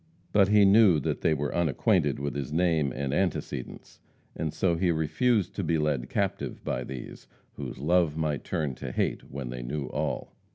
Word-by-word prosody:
But 100 -2 +5
he 105 0 +6
knew 100 -5 +6
that - - -2
they 80 - +3
were 75 0 -2
unacquainted 85 - +2
with 70 -1 -3
his 70 0 -4
name 80 -4 +2
and 70 +1 -3
antecedents, 90 +2 -3 0.4
and 80 -2 -2
so 90 0 +1
he 90 +2 +1
refused 95 - +1
to - - -1
be 80 - +1
led 75 -5 -1
captive - - -2
by - - -2
these, 65 -2 -8 0.3
whose - - -6
love 80 +1 +2
might 75 -3 -1
turn 75 -4 -2
to - - -5
hate - - -2
when 65 -3 -5
they 60 0 -5
knew 70 +4 -3
all. - - -3
80 Hz, 180 wpm, -28 LUFS, 70-90 Hz, 0.4 s, he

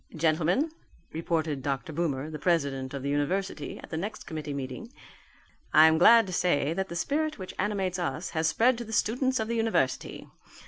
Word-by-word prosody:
"Gentlemen," 165 - +1 0.4
reported 160 -3 -1
Dr. 140 +4 -3
Boomer, 150 -2 -2
the 155 - -6
president 140 -6 0
of 135 - -5
the 140 - -2
university, 145 +3 -2
at - - -12
the 160 - -2
next 210 +6 -5
committee 155 -2 -5
meeting, 140 - -6 0.8
"I 155 - +9
am 160 0 +4
glad 230 +5 +7
to 185 - -6
say 155 -4 +1
that 190 +2 -3
the 170 - -6
spirit 305 - -1
which 185 -1 -7
animates 190 -3 -1
us 165 0 -3
has 160 -1 0
spread 230 +9 +3
to - - -4
the 220 -1 -8
students 255 +4 +1
of 220 - -1
the 235 - -2
university. 225 - -1
170 Hz, 185 wpm, -28 LUFS, 145-210 Hz, 0.8 s, I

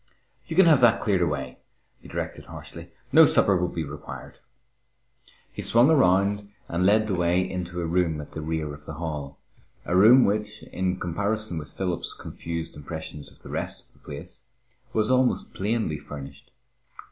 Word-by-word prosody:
"You 160 - -4
can 190 +1 +7
have 155 -6 +6
that 115 -1 +6
cleared 95 -4 +1
away," 70 -6 -2 0.4
he - - -15
directed - - -5
harshly. - - -10 0.2
"No - - +8
supper 100 - +3
will 90 0 +1
be 85 -2 -3
required." 75 0 -9 1.1
He - - -6
swung 120 +6 +4
around 100 - +3 0.2
and 90 +2 +1
led 110 +2 +4
the 105 - -2
way 90 +1 +2
into 90 -1 -4
a - - -2
room 85 -2 +1
at 75 - -8
the 80 - -5
rear 80 -1 -3
of 75 0 -12
the - - -5
hall, 75 -4 -5 0.5
a 90 - -1
room 115 +7 +7
which, 105 +1 -2
in 90 0 -2
comparison 100 +1 -1
with 75 - -9
Philip's 90 -3 -3
confused 85 -1 -6
impressions 75 -1 -8
of - - -20
the - - -10
rest - - -4
of - - -17
the - - -23
place, 70 -1 -9 0.5
was 110 +2 +1
almost 130 -1 +2
plainly 100 -6 -1
furnished. 70 -1 -10
90 Hz, 170 wpm, -26 LUFS, 80-105 Hz, 1.1 s, No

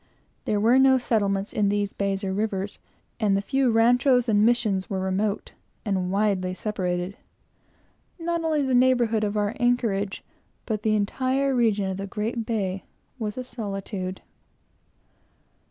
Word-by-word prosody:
There 210 - +1
were 235 +5 +4
no 265 0 +6
settlements 200 -5 0
on 205 -2 +2
these 205 0 -1
bays 195 0 -2
or 190 -1 -1
rivers, 200 -1 -2 0.4
and 205 -3 +2
the - - +1
few 270 +2 +1
ranchos 245 +2 +4
and 210 -2 +3
Missions 220 -4 +1
were 195 -3 -2
remote 195 +2 -1 0.3
and 190 -3 -1
widely 195 -3 0
separated. 185 -2 -3 1.0
Not 335 -1 -2
only 310 -3 +1
the 265 -1 0
neighborhood 245 -3 +3
of 210 0 -1
our 205 +2 0
anchorage, 230 -5 0 0.4
but 215 -2 -2
the 215 0 +2
entire 260 +6 0
region 220 -5 +2
of 190 0 -3
the 195 0 -5
great 220 +3 -3
bay, 195 -4 -2 0.4
was 210 -1 -3
a 255 - -3
solitude. 195 -5 -5
210 Hz, 145 wpm, -25 LUFS, 195-245 Hz, 1.0 s, no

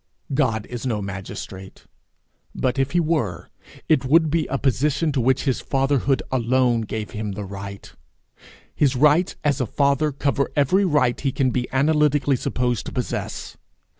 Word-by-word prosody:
God 115 -7 +1
is 120 -2 -7
no 120 -5 -1
magistrate; 95 -1 -8 0.7
but, 130 +1 -1
if 135 +3 0
he 175 - +3
were, 150 - -1 0.4
it 155 -4 +3
would 155 +3 +3
be 160 -1 +1
a 140 - -1
position 140 +3 +1
to 135 -3 0
which 130 +2 +2
his 130 -4 0
fatherhood 135 0 +1
alone 125 -1 +2
gave 110 0 -5
him 105 -1 -4
the 105 +1 -5
right; 100 0 -8 0.8
his 140 -3 +2
rights 150 +7 +3
as 145 -2 +1
a 125 - -1
father 140 +3 +1
cover 140 0 0
every 180 +8 +3
right 145 -8 +2
he 140 - 0
can 130 0 +1
be 125 0 -2
analytically 145 0 +2
supposed 125 -4 -1
to - - -5
possess. 125 -2 -4
130 Hz, 160 wpm, -22 LUFS, 120-145 Hz, 0.8 s, he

